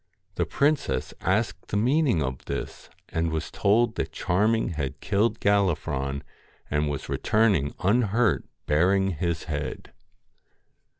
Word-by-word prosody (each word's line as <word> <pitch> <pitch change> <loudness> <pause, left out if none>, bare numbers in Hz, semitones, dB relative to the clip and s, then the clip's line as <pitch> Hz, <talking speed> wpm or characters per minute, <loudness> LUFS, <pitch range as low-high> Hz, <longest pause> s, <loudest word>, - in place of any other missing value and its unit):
The - - -1
princess 145 +1 0
asked 95 -1 0
the 100 - -1
meaning 125 - +2
of 65 -2 -5
this, - - -5 0.2
and 80 0 0
was 80 0 -3
told 110 +3 +2
that - - -2
Charming 105 +6 +1
had 70 -4 -4
killed 105 +3 +1
Gallifron, 80 -9 0 0.5
and 75 0 +1
was 70 - -4
returned 100 -10 +2
unhurt 110 +2 +2 0.2
bearing 95 +6 +3
his 85 0 -2
head. 75 -2 -5
95 Hz, 120 wpm, -26 LUFS, 75-110 Hz, 0.5 s, bearing